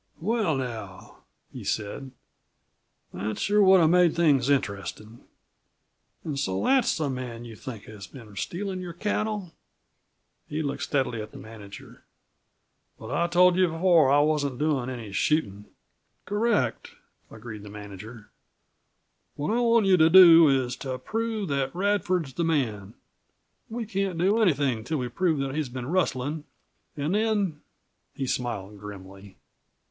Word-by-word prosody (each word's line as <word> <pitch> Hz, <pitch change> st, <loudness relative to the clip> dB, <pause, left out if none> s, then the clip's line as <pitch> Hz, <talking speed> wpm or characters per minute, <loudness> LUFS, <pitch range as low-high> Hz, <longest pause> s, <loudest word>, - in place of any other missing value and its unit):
"Well, 205 Hz, -3 st, 0 dB
now," 110 Hz, -7 st, -7 dB, 0.4 s
he -, -, -8 dB
said, 110 Hz, +6 st, -3 dB, 1.0 s
"that 105 Hz, +4 st, -4 dB
sure 210 Hz, +1 st, +2 dB
would 190 Hz, -2 st, +6 dB
have 160 Hz, 0 st, +4 dB
made 180 Hz, -2 st, +4 dB
things 145 Hz, -6 st, +3 dB
interestin'. 110 Hz, -3 st, -2 dB, 1.1 s
An' 150 Hz, -3 st, -3 dB
so 95 Hz, -8 st, -1 dB
that's 265 Hz, -1 st, +3 dB
the 155 Hz, -2 st, -1 dB
man 125 Hz, -3 st, -5 dB
you 115 Hz, -2 st, -10 dB
think 110 Hz, -1 st, -8 dB
has 105 Hz, -3 st, -11 dB
been 110 Hz, -1 st, -13 dB
stealin' 185 Hz, -, -4 dB
your 175 Hz, -2 st, -7 dB
cattle?" 205 Hz, -1 st, -3 dB, 1.0 s
He 155 Hz, +1 st, -2 dB
looked 140 Hz, -, -3 dB
steadily 130 Hz, -5 st, -1 dB
at 105 Hz, -, -8 dB
the -, -, -13 dB
manager. 105 Hz, -3 st, -12 dB, 0.9 s
"But 110 Hz, +2 st, -9 dB
I 170 Hz, +5 st, +1 dB
told 180 Hz, +1 st, +4 dB
you 185 Hz, -1 st, +4 dB
before 165 Hz, -2 st, +3 dB
that 140 Hz, -, +4 dB
I -, -, +5 dB
wasn't 145 Hz, -4 st, 0 dB
doin' 145 Hz, -4 st, 0 dB
any 120 Hz, -5 st, -7 dB
shootin'." 105 Hz, -3 st, 0 dB, 0.6 s
"Correct," 210 Hz, +2 st, -1 dB, 0.3 s
agreed 110 Hz, -1 st, -9 dB
the 105 Hz, -, -10 dB
manager. 105 Hz, +2 st, -10 dB, 1.0 s
"What 150 Hz, +10 st, -1 dB
I -, -, +1 dB
want 230 Hz, -3 st, +3 dB
you 190 Hz, -1 st, +5 dB
to 160 Hz, -1 st, +5 dB
do 165 Hz, -3 st, +9 dB
is 130 Hz, -2 st, +1 dB
to 130 Hz, -2 st, -4 dB
prove 220 Hz, -, -3 dB
that 135 Hz, 0 st, -1 dB
Radford's 185 Hz, -6 st, 0 dB
the 170 Hz, -, -2 dB
man. 115 Hz, -11 st, -1 dB, 0.7 s
We 230 Hz, +1 st, -4 dB
can't 195 Hz, -4 st, -2 dB
do 200 Hz, +6 st, +2 dB
anything 140 Hz, -, +2 dB
until 135 Hz, +8 st, -3 dB
we 125 Hz, -2 st, -3 dB
prove 165 Hz, +4 st, 0 dB
that 135 Hz, -1 st, -3 dB
he's 150 Hz, -3 st, -2 dB
been 125 Hz, 0 st, -6 dB
rustlin'. 150 Hz, -2 st, -1 dB, 0.5 s
An' 145 Hz, +3 st, -1 dB
then 205 Hz, -6 st, 0 dB, 0.3 s
" -, -, -49 dB
He 135 Hz, -, -3 dB
smiled 105 Hz, -6 st, -4 dB
grimly. 100 Hz, -1 st, -11 dB
145 Hz, 150 wpm, -26 LUFS, 115-180 Hz, 1.1 s, do